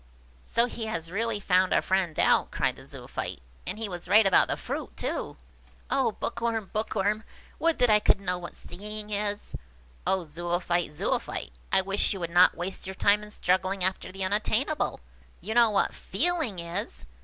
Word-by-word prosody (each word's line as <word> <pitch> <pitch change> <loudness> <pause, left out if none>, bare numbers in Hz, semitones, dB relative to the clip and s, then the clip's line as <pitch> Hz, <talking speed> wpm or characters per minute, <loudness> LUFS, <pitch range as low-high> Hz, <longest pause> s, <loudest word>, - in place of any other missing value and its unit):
"So 235 - +2
he 230 -2 -5
has 165 -6 -3
really 225 +2 0
found 185 -1 +3
our - - +4
friend 185 -4 +1
out!" - - +4
cried - - 0
the - - -14
Zoophyte; - - -5 0.3
"and 185 +3 -1
he 220 -1 -2
was 175 -3 -5
right 210 +3 +6
about 195 - +5
the - - -1
fruit, - - -5
too! - - -3 0.5
Oh, - - +2
Bookworm, 225 -3 -2
Bookworm! 215 0 0 0.4
would 330 0 +2
that 245 -3 +4
I 210 - +6
could 210 - +3
know 180 -2 -1
what 175 - -8
seeing 210 +3 -7
is!" 205 0 -2 0.5
"Oh, 190 -1 +2
Zoophyte, 175 +2 -1
Zoophyte! 150 - -2 0.2
I - - +4
wish 195 +2 0
you 195 - -6
would 170 -1 -4
not 180 +1 +6
waste 185 +2 -4
your 190 - -5
time 205 +2 +4
in 210 - -10
struggling 185 -1 0
after 185 0 -1
the 195 +1 -3
unattainable! 215 +9 0 0.4
You 220 - -4
know 235 -1 +6
what 205 -2 +1
feeling 330 - -1
is. 170 - -4
195 Hz, 180 wpm, -28 LUFS, 180-215 Hz, 0.5 s, right